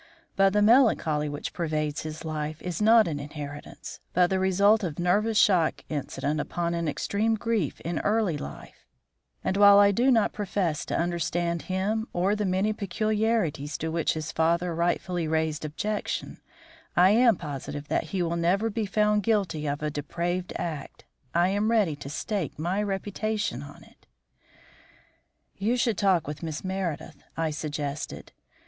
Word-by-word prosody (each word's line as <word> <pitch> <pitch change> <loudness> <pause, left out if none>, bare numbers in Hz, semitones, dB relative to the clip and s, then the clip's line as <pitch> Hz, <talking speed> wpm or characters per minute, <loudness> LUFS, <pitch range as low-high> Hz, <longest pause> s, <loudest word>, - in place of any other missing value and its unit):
But 195 0 +4
the 210 0 +3
melancholy 205 - +4
which 145 0 -5
pervades 155 -3 -2
his 155 +1 -7
life 155 0 -3
is 180 +1 -3
not 220 0 +6
an 150 -3 -3
inheritance, 145 0 -8
but 180 0 +3
the 190 - +2
result 200 +3 +3
of 165 -5 -3
nervous 205 +5 +1
shock 180 -7 +3
incident 145 0 -2
upon 170 +3 -2
an 170 -1 -1
extreme 205 +9 0
grief 220 - -1
in 170 -1 -2
early 210 -5 +1
life, 70 - -9 0.6
and 190 - 0
while 200 0 +8
I 200 0 +6
do 240 +7 +2
not 225 -5 +3
profess 195 -6 -1
to - - -2
understand 170 0 -1
him 210 +5 -1
or 190 +4 +1
the 210 -1 -1
many 190 +4 +1
peculiarities 210 -7 -1
to 160 - -3
which 165 -1 0
his 155 -1 -4
father 170 +2 +1
rightfully 175 0 -1
raised 160 0 -1
objection, 205 +8 -3 0.6
I 180 +2 +6
am 230 0 +5
positive 145 -2 -6
that - - 0
he 180 +2 -2
will 170 0 -1
never 195 +7 +1
be 215 0 -2
found 210 +1 +2
guilty 195 -8 0
of 145 +1 -2
a 150 - -1
depraved 170 +5 -3
act. 160 -5 -5 0.3
I 175 +2 +4
am 205 +3 +1
ready 210 -9 +2
to 140 - -8
stake 175 - -3
my 175 +6 -1
reputation 205 - -2
on 145 0 -11
it." - - -23 1.5
"You 225 +6 +1
should 230 -4 +1
talk 190 -6 +3
with 150 0 -6
Miss 160 -2 -5
Meredith," 185 -5 -4 0.2
I 165 -1 0
suggested. 150 -1 -5
175 Hz, 160 wpm, -27 LUFS, 155-205 Hz, 1.5 s, while